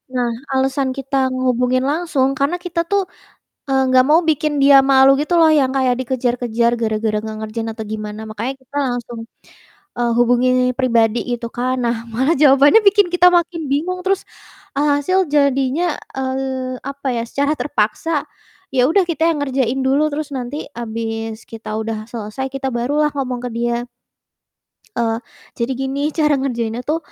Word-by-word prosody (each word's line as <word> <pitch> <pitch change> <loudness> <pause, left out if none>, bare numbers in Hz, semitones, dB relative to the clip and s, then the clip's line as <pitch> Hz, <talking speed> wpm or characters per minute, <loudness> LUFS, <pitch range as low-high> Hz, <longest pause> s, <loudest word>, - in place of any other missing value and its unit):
Nah 245 -1 +1 0.3
alasan 265 0 +1
kita 275 +1 -4 0.2
ngehubungin 255 0 +1
langsung 285 -4 0
karena 285 +6 +1
kita 345 -1 -2
tuh, 400 0 +1 0.7
eee, 265 0 +3
nggak 255 0 +6
mau 315 - +6
bikin 305 -1 +1
dia 275 0 +7
malu 270 0 +6
gitu 305 - -2
loh, 320 - +6
yang 275 -4 +3
kayak 255 -2 +2
dikejar-kejar 240 -2 0
gara-gara 215 -1 0
nggak 220 0 -6
ngerjain 225 +1 -4
atau 220 -1 -7
gimana 215 0 -6
makanya 225 +5 -4
kita 260 +2 -17
langsung, 240 -1 -4 0.8
eee, 240 -1 +1
hubungi 245 +1 +3 0.3
pribadi 235 -3 +2 0.2
gitu 235 - -6
kan, 255 +1 -1
nah 235 0 +1 0.2
malah 265 +7 +2
jawabannya 285 +8 +6
bikin 405 -1 +5
kita 360 0 +6
makin 345 -1 +1
bingung, 360 +6 -1
terus, 390 0 +1 0.6
alhasil 295 +6 +2
jadinya, 280 +3 +1 0.2
eee, 260 -1 -3
apa 275 0 -6
ya, 230 - -1
secara 285 +2 0
terpaksa, 290 +4 -1 0.5
ya 250 -1 +4
udah 380 +4 +4
kita 320 -1 -1
yang 320 - 0
ngerjain 265 -1 -1
dulu, 290 +3 +2
terus 300 -1 -3
nanti 255 +4 -5
habis 225 -1 -5
kita 225 -1 -9
udah 220 -1 -4
selesai, 230 +3 -4
kita 270 0 -2
barulah 290 +6 +1
ngomong 255 -3 -2
ke - - -3
dia. 235 0 -1 1.2
Eee, 225 -1 0 0.4
jadi 235 +2 -1
gini 270 +1 -2 0.2
"Cara 300 -1 +3
ngerjainnya 235 -3 -2
tuh 320 +2 +1
265 Hz, 155 wpm, -19 LUFS, 235-290 Hz, 1.2 s, dia